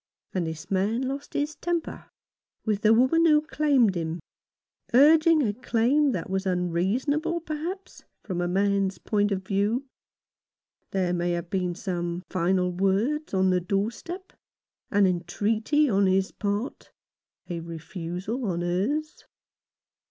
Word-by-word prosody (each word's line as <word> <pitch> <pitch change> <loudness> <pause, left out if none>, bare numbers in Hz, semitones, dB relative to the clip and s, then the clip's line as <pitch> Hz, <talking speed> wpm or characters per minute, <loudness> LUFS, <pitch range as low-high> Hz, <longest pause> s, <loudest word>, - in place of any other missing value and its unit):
And 180 -3 -1
this 160 +2 -7
man 205 +6 +1
lost 275 +2 -5
his 295 +1 -1
temper 340 -1 -3 0.6
with 210 -2 0
the 215 - +5
woman 260 +8 +4
who 300 -1 +6
claimed 290 -8 +2
him 165 -1 -3 0.4
— - - -36
urging 310 +3 +6
a 210 -4 0
claim 255 +5 +2
that 185 -8 -3
was 190 +1 -2
unreasonable, 205 - 0
perhaps, 340 +5 -6 0.2
from 180 -3 -3
a 175 - 0
man's 195 +1 +1
point 205 -1 0
of 190 -1 -1
view. 205 +7 0 1.0
There 185 -2 0
may 175 0 0
have 170 0 -4
been 180 -2 -1
some 175 -2 -3
final 180 0 +1
words 200 - 0
on 190 0 +3
the 180 0 +2
doorstep 230 - -3 0.3
— - - -69
an 205 -1 +4
entreaty 215 - +1
on 200 -4 +3
his 190 0 +2
part 205 +4 -3 0.3
— - - -51
a 175 -2 -4
refusal 175 - -5
on 175 -4 -1
hers. 210 - -2
200 Hz, 140 wpm, -26 LUFS, 180-280 Hz, 1.0 s, who